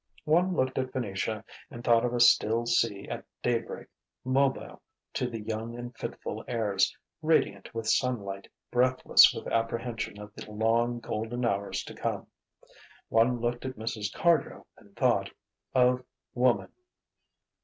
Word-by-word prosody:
One 175 +4 +3
looked 130 -2 0
at 130 -1 -2
Venetia 110 -2 -3 0.2
and 120 - -9
thought 115 -2 +4
of 125 - 0
a 120 - -1
still 115 -1 +5
sea 115 -4 +1
at - - -5 0.2
daybreak, 120 -2 -1 0.4
mobile 135 +1 0 0.3
to 125 - -1
the 115 -2 -5
young 110 +2 -4
and 120 0 -7
fitful - - -5
airs, 105 -5 +1 0.2
radiant 155 -11 +1
with 115 -1 -3
sunlight, 105 -5 0 0.2
breathless 130 +1 +6
with - - -7
apprehension 115 -2 -2
of 105 0 -10
the 105 - -10
long, 115 +2 +1
golden 115 +2 -3
hours 100 -3 -1
to - - -9
come. - - -3 0.8
One 120 +2 +3
looked 120 +1 -2
at 130 0 -4
Mrs. 110 -1 -3
Cardrow 170 -4 +1
and - - -21
thought - - +2 0.5
of 125 0 +4 0.3
Woman. 125 -1 +2
120 Hz, 140 wpm, -29 LUFS, 110-125 Hz, 0.8 s, breathless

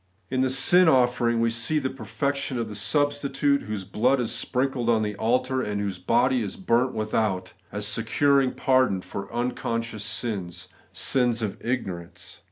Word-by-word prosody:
In 130 0 +1
the 130 - +2
sin 170 +7 +5
offering 125 -3 +2
we 115 0 +2
see 115 +7 0
the 130 -3 -1
perfection 140 +2 -3
of 115 -2 -3
the 105 - -7
substitute, 145 +3 +1
whose 105 -2 -5
blood 125 +7 +1
is 120 - -1
sprinkled 125 +1 0
on 110 -2 +3
the 105 -1 -3
altar, 125 +4 +1
and 105 -3 -3
whose 100 -3 -3
body 120 +6 +2
is 105 - -4
burnt 130 -7 +1
without, 110 -4 -1 0.2
as 105 +1 -3
securing 130 +5 +2
pardon 130 -8 +2
for 100 +1 -7
unconscious 115 -2 -3
sins, 95 -6 -3
— - - -34
sins 120 -3 +1
of 105 - -2
ignorance. 95 -9 -5
120 Hz, 165 wpm, -25 LUFS, 105-130 Hz, 0.2 s, sin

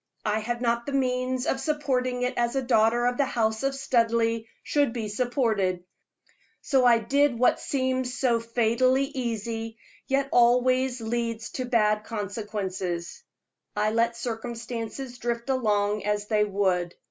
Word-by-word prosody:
I 215 0 +1
had 240 +2 -3
not 235 +1 0
the 280 - -3
means 255 -1 0
of 270 - 0
supporting 260 -4 -1
it 250 +1 0
as 240 +1 0
a 270 - 0
daughter 235 0 +3
of 245 0 +1
the 280 - +3
house 220 -3 0
of 275 0 0
Studleigh 230 -3 +1 0.2
should 285 -5 +1
be 225 -3 -3
supported, 210 -6 0 0.8
so 265 -3 +2
I 240 -1 +7
did 265 +3 +2
what 250 - +3
seems 260 -2 -1
so 240 -3 +2
fatally 240 +3 +2
easy, 225 -4 -4 0.3
yet 275 0 +1
always 250 +1 +3
leads 230 0 -3
to 255 - -3
bad 215 -3 +2
consequences 200 -5 -4 0.5
I 210 +1 +1
let 230 +1 +1
circumstances 235 +2 -5
drift 235 +2 -2
along 210 -4 +1
as 210 0 -1
they 210 -1 +2
would. 185 -4 0
235 Hz, 145 wpm, -26 LUFS, 220-255 Hz, 0.8 s, I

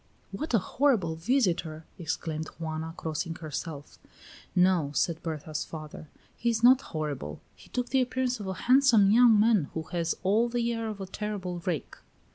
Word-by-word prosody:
"What 310 -5 -2
a 200 - +1
horrible 230 - +2
visitor!" 165 - 0
exclaimed 160 -1 -3
Juana, 160 0 -4
crossing 165 +1 -3
herself. 155 -2 -7 0.6
"No," 180 -5 +3
said 165 +4 0
Berta's 155 -2 -4
father, 155 -1 -9 0.3
"he 235 - 0
is 225 -1 -1
not 255 +2 +7
horrible; 145 - -5 0.2
he - - -18
took 245 -1 -2
the 265 -1 +3
appearance 255 -1 -1
of 205 - -6
a 190 - -3
handsome 245 -6 +6
young 230 -1 +6
man 215 -6 +4
who 160 - -2
has 170 -2 -1
all 215 +5 +3
the 235 0 0
air 230 -1 -3
of 210 -2 -5
a - - -3
terrible 190 -2 -4
rake." 170 -5 -3
185 Hz, 165 wpm, -28 LUFS, 160-235 Hz, 0.6 s, not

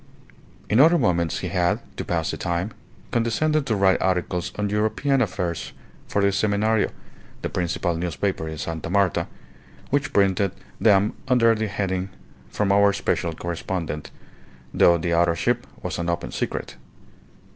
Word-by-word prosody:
In 110 - +3
other 165 +5 +7
moments 85 - +1
he - - -3
had, 85 -1 +1 0.2
to - - -4
pass - - -1
the - - -5
time, 85 +5 -2 0.4
condescended 140 +6 +1
to 110 - +1
write 95 -1 +3
articles 90 -1 0
on 105 0 0
European 110 +6 +1
affairs 90 -6 -2 0.3
for 100 - 0
the 100 - +5
Semenario, 105 +2 +1 0.5
the - - -1
principal 85 0 -1
newspaper 90 0 -2
in 80 0 -5
Sta. 80 +1 -4
Marta, 100 -1 +2 0.6
which 145 +1 +1
printed 100 -1 +2 0.3
them 105 -1 +4
under 120 -3 +5
the 110 0 -1
heading 95 -2 -2 0.4
"From 100 -2 0
our 100 0 +5
special 85 -3 -1
correspondent," 85 -2 -4 0.6
though 85 0 +5
the 85 +1 -1
authorship 85 0 +1 0.2
was - - -3
an 85 0 -1
open 85 - -2
secret. - - -4
95 Hz, 145 wpm, -24 LUFS, 85-110 Hz, 0.6 s, other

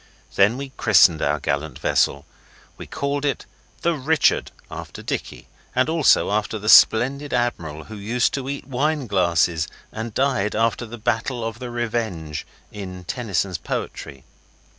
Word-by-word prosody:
Then 105 +5 +4
we 140 0 -5
christened 95 -7 +5
our - - +1
gallant 70 +2 -2
vessel. 70 0 +1 0.5
We - - -10
called 140 0 -2
it 145 -2 -1 0.4
the 170 - +3
Richard, 155 +2 +2 0.2
after - - -8
Dicky, - - -5 0.3
and 130 +4 +2
also 160 -9 +4
after 105 +1 -1
the 105 0 -3
splendid 135 +7 +5
admiral 80 -11 -2
who 110 - -10
used 115 +4 0
to 135 -1 -3
eat 140 -1 -5
wine 140 +2 -1
glasses 85 -5 +1 0.2
and 110 +1 -5
died 130 -4 0
after 115 +2 0
the 120 +2 -8
Battle 120 +1 -1
of 115 0 -4
the 125 -1 -6
Revenge 110 -11 -3 0.2
in 90 -3 -8
Tennyson's 95 -4 -2
poetry. 65 -1 -5
115 Hz, 145 wpm, -22 LUFS, 95-130 Hz, 0.5 s, christened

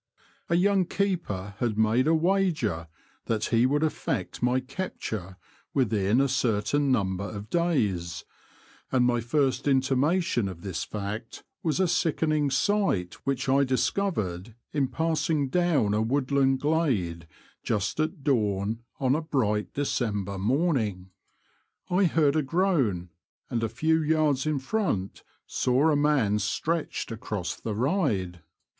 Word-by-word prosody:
A 170 - +3
young 190 +1 +3
keeper 170 - -2
had 115 -4 -1
made 110 +5 +3
a 165 - +4
wager 160 - +1 0.4
that 110 -1 0
he 115 +2 +5
would 145 +3 +1
effect 115 - -2
my 125 +1 +2
capture 115 - -5 0.4
within 110 -3 +2
a 140 - +3
certain 130 +2 +1
num 95 -6 +1
ber 100 - -4
of 105 0 -8
days, 100 - 0 0.7
and 125 -2 +3
my 120 -1 +2
first 135 +3 0
intimation 135 - +2
of 85 -3 -9
this 95 -4 -3
fact 105 +2 -6 0.2
was 160 +1 0
a 190 - +3
sickening 160 -3 +1
sight 135 - +1
which 135 -1 -1
I 135 +1 +4
discovered 120 - -1 0.2
in 140 -3 +1
passing 160 -2 0
down 160 -11 +2
a 105 - +1
woodland 135 +2 +2
glade 115 - 0 0.3
just 110 +5 -1
at 155 -2 -1
dawn 110 -5 0 0.2
on 130 -1 +2
a 155 - +1
bright 110 -9 -1
December 105 -8 -1
morning. 110 - 0 0.8
I 185 +2 +4
heard 155 -4 +3
a 155 - +3
groan, 135 - +1 0.4
and 120 -2 0
a 115 - 0
few 160 +8 +1
yards 155 -2 +1
in 155 -2 +1
front 135 - -2 0.2
saw 130 +5 +2
a - - +3
man 140 -8 +2
stretched 155 - -2
across 105 -5 -4
the 110 -2 -5
ride. 110 - 0
130 Hz, 135 wpm, -27 LUFS, 105-155 Hz, 0.8 s, he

